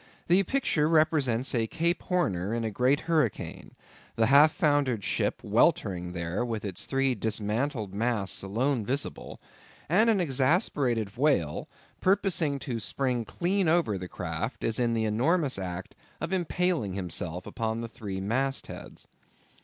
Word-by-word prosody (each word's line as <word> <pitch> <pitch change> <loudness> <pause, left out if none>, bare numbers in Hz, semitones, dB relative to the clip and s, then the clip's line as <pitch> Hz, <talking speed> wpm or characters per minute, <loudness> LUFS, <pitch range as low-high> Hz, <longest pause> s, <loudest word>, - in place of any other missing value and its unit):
The 180 +3 +4
picture 190 - +1
represents 145 -6 +2
a 115 -3 +1
Cape 170 +8 0
Horner 110 - 0
in 120 - -2
a 110 - -2
great 125 +7 +2
hurricane; 155 - -1 0.4
the 115 - +3
half 140 +5 +7
foundered 145 - +1
ship - - -1
weltering 90 -2 +1
there 85 +5 -2
with 115 -3 -3
its 95 -3 -5
three 135 -1 +1
dismantled 110 +1 -2
masts 105 -3 0
alone 115 +5 0
visible; 135 +6 -3 0.5
and 215 +9 +4
an 215 -3 +3
exasperated 130 - +1
whale, 130 - +1 0.3
purposing 185 -6 +1
to 120 -4 -3
spring 125 +1 -1
clean 185 - 0
over 160 -10 +2
the 90 - -6
craft, - - -4
is 115 +1 +1
in 120 -1 +1
the 110 -1 0
enormous 130 - +1
act 90 -1 -5 0.3
of 180 - -3
impaling 175 - 0
himself 90 -2 -4
upon 115 0 -3
the 115 - -4
three 100 -4 -6
mast 130 +8 0
heads. - - -10
125 Hz, 145 wpm, -28 LUFS, 105-155 Hz, 0.5 s, half